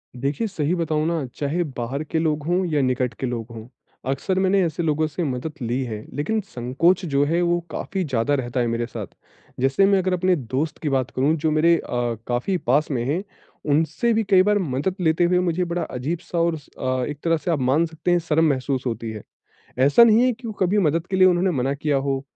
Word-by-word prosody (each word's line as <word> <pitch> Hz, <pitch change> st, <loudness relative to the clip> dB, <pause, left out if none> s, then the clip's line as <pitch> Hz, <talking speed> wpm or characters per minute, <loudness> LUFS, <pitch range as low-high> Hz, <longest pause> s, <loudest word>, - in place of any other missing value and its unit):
देखिए 140 Hz, -, -2 dB
सही 165 Hz, -3 st, -1 dB
बताऊँ 160 Hz, -2 st, 0 dB
ना 165 Hz, -5 st, -1 dB
चाहे 155 Hz, +5 st, -1 dB
बाहर 130 Hz, +5 st, -3 dB
के 160 Hz, +1 st, -2 dB
लोग 155 Hz, -2 st, 0 dB
हों 180 Hz, +1 st, +1 dB
या 145 Hz, -, +3 dB
निकट 125 Hz, -1 st, 0 dB
के 130 Hz, -, -2 dB
लोग 115 Hz, -2 st, -4 dB
हों, 115 Hz, 0 st, -9 dB, 0.4 s
अक्सर 185 Hz, +8 st, -1 dB
मैंने 190 Hz, +1 st, +3 dB
ऐसे 165 Hz, +1 st, -2 dB
लोगों 155 Hz, 0 st, +1 dB
से 165 Hz, +3 st, -4 dB
मदद 140 Hz, +2 st, -3 dB
ली 120 Hz, +3 st, -1 dB
है। 110 Hz, -3 st, -6 dB
लेकिन 190 Hz, +10 st, 0 dB
संकोच 140 Hz, +10 st, +1 dB
जो 140 Hz, -2 st, +1 dB
है 170 Hz, +4 st, +1 dB
वो 175 Hz, 0 st, +2 dB
काफ़ी 190 Hz, +3 st, -3 dB
ज़्यादा 135 Hz, -1 st, 0 dB
रहता 125 Hz, -1 st, -2 dB
है 120 Hz, -, +1 dB
मेरे 115 Hz, 0 st, -1 dB
साथ। 110 Hz, -5 st, -6 dB, 0.5 s
जैसे 135 Hz, +9 st, +3 dB
मैं 195 Hz, -1 st, +4 dB
अगर 185 Hz, 0 st, 0 dB
अपने 180 Hz, 0 st, +2 dB
दोस्त 140 Hz, +4 st, -3 dB
की 150 Hz, -, -1 dB
बात 130 Hz, -2 st, 0 dB
करूँ 140 Hz, +5 st, +2 dB
जो 155 Hz, +1 st, 0 dB
मेरे 165 Hz, +2 st, +4 dB
अ, 120 Hz, -1 st, -2 dB
काफ़ी 125 Hz, +10 st, 0 dB
पास 145 Hz, +2 st, +1 dB
में 120 Hz, -3 st, -1 dB
हैं 165 Hz, +8 st, -1 dB, 0.5 s
उनसे 160 Hz, +10 st, +1 dB
भी 220 Hz, 0 st, +1 dB
कई 185 Hz, -2 st, +6 dB
बार 210 Hz, +1 st, +3 dB
मदद 160 Hz, +3 st, -1 dB
लेते 160 Hz, +1 st, +2 dB
हुए 180 Hz, +1 st, +3 dB
मुझे 180 Hz, 0 st, 0 dB
बड़ा 175 Hz, +1 st, -2 dB
अजीब-सा 165 Hz, +7 st, -4 dB
और 170 Hz, 0 st, +2 dB
उस 150 Hz, -3 st, -9 dB
अ, 130 Hz, -1 st, -1 dB
एक 145 Hz, -, -6 dB
तरह 165 Hz, -1 st, +2 dB
से 170 Hz, +2 st, -2 dB
आप 155 Hz, -, 0 dB
मान 135 Hz, +6 st, +2 dB
सकते 160 Hz, +2 st, -3 dB
है 175 Hz, -, +4 dB
शर्म 160 Hz, -1 st, +1 dB
महसूस 130 Hz, -1 st, -1 dB
होती 115 Hz, -1 st, -3 dB
है। 105 Hz, -2 st, -8 dB, 0.6 s
ऐसा 145 Hz, -, +6 dB
नहीं 225 Hz, +1 st, +5 dB
है 255 Hz, 0 st, +3 dB
कि 230 Hz, -1 st, -7 dB
कभी 190 Hz, +3 st, +2 dB
मदद 165 Hz, -1 st, +1 dB
के 190 Hz, -, 0 dB
लिए 185 Hz, 0 st, +6 dB
उन्होंने 180 Hz, +1 st, +3 dB
मना 135 Hz, +2 st, 0 dB
किया 145 Hz, 0 st, 0 dB
हो 135 Hz, -1 st, -1 dB
155 Hz, 225 wpm, -23 LUFS, 130-175 Hz, 0.6 s, कई